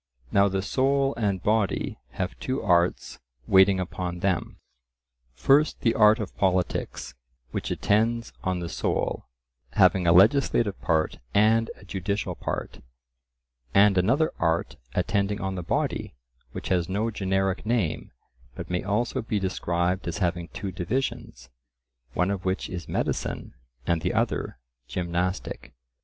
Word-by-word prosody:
Now 100 0 +5
the 95 -1 -1
soul 135 +4 +1
and 100 -5 -1
body 105 -2 0
have 90 -1 -3
two 130 +2 -2
arts 85 -2 +1 0.3
waiting 95 +2 +5
upon 90 -1 -4
them, 95 -3 -1 0.8
first 145 - +3
the 115 - +3
art 105 +1 +6
of 105 - -5
politics, 90 -8 -1 0.4
which - - -3
attends 115 +3 +1
on 90 -1 -1
the 85 - -3
soul, - - -2 0.5
having 90 -2 +4
a - - +6
legislative 105 +2 +4
part 80 -2 0 0.2
and 110 +2 +4
a - - -16
judicial 100 +2 -2
part; - - -5 1.0
and 100 0 +6
another 130 - +2
art 80 0 0 0.2
attending 100 +3 0
on 95 -1 -2
the 90 - -4
body, 85 - -2 0.4
which - - -6
has 90 -2 +1
no 105 +4 0
generic 95 -2 0
name, 110 -7 -1 0.5
but - - -7
may 90 - 0
also 105 +4 -1
be 110 -1 -2
described 90 -1 -1
as 85 - -3
having 85 -3 -1
two 100 0 -6
divisions, 90 - -3 0.6
one 90 +2 +2
of 95 -2 -3
which 95 +1 -2
is 90 -2 -6
medicine - - -2 0.3
and 85 -2 +1
the 90 - -1
other 115 - -1 0.3
gymnastic. 90 -5 -3
95 Hz, 135 wpm, -26 LUFS, 90-110 Hz, 1.0 s, art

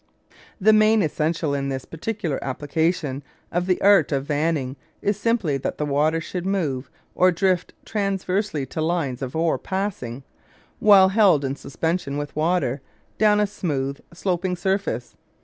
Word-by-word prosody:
The 215 +2 +5
main 215 0 +5
essential 155 0 -1
in 140 -1 -1
this 135 -1 -4
particular 165 -3 -4
application 145 +1 -1 0.3
of 175 +1 -1
the 185 - +2
art 200 -3 +5
of 135 -1 0
vanning 145 -3 -1 0.2
is 205 - 0
simply 210 -9 0
that 135 - -4
the 150 - -1
water 150 +3 +1
should 175 +2 -5
move 160 -9 -1 0.2
or 185 0 +4
drift 180 0 0
transversely 195 -6 -1
to 155 - -5
lines 160 -6 -1
of 130 +1 -5
ore 165 0 +1
passing, 185 - -4 0.6
while 195 -3 +7
held 190 -8 +4
in 135 +1 -2
suspension 155 0 -2
with 145 0 -5
water, 155 -4 0 0.4
down 210 -1 +4
a 210 - +3
smooth 145 -9 -3
sloping 180 +1 -1
surface. 190 - -2
165 Hz, 150 wpm, -23 LUFS, 140-195 Hz, 0.6 s, while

